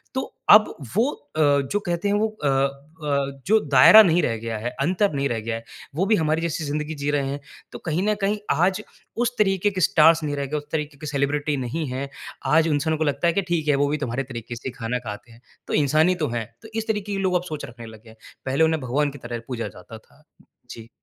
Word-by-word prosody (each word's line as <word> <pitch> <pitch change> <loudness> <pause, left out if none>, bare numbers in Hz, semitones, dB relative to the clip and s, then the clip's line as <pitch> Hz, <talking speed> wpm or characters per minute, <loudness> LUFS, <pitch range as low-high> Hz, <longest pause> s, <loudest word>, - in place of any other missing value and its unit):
तो 260 - -3 0.2
अब 215 0 +7 0.2
वो 230 +6 +3 0.3
अ, - - +3
जो 145 +5 +2
कहते 175 -1 -2
हैं 200 - +2
वो 215 +2 +2 0.2
अ - - +4 0.6
अ, 140 -2 -1
जो 220 +3 +5
दायरा 140 +11 +9
नहीं 175 -2 +3
रह 115 - 0
गया 115 0 -4
है, 110 +3 -3
अंतर 185 +6 +1
नहीं 140 0 0
रह 115 - -1
गया 115 +1 -3
है, 115 - -7 0.3
वो 180 +5 +1
भी 215 - +4
हमारी 160 -2 +1
जैसी 165 -1 -2
ज़िंदगी 150 +2 -3
जी 145 0 -3
रहे 140 -2 0
हैं। 140 +1 -4 0.3
तो - - -8
कहीं 165 +2 0
ना 210 +1 +2
कहीं 200 +2 +1
आज 180 +7 +2 0.4
उस 245 0 0
तरीके 195 -1 +2
के 185 -2 -3
स्टार्स 160 0 +5
नहीं 145 -1 -2
रह 140 - -2
गए, 150 +3 -3
उस 145 0 -7
तरीके 150 -2 -3
के - - -8
सेलिब्रिटी 145 +1 0
नहीं 130 +5 -3
हैं। 135 +2 -4 0.4
आज 160 +1 +5
इंसानों 155 +1 0
को - - +2
लगता 150 +3 0
है 170 - +2
कि 200 - +1
ठीक 160 -3 0
है 145 - +4
वो 145 - +2
भी 150 - 0
तुम्हारे 125 +3 -2
तरीके 120 -2 -7
से 125 - -5
खाना 125 +2 -2
खाते 110 0 -8
हैं, 115 +1 -18 0.3
तो - - -4
इंसान 155 +3 +3
ही 185 - +2
तो - - +2
हैं। 115 -2 -3 0.2
तो 220 - -11
इस 225 -1 -2
तरीके 210 -2 -2
के 195 - -2
लोग 185 -2 +1
अब 175 - +1
सोच 150 - -5
रखने 120 -1 -11
लग 110 -1 -13
गए 115 - -16
हैं। 110 - -16 0.3
पहले 135 +4 +2
उन्हें 160 -1 0
भगवान 140 +4 0
की 145 - -10
तरह 120 -1 -5
पूजा 120 -3 -3
जाता 100 +5 -11
था। 150 +6 -26 0.5
जी। 115 -1 -10
150 Hz, 250 wpm, -23 LUFS, 130-175 Hz, 0.6 s, दायरा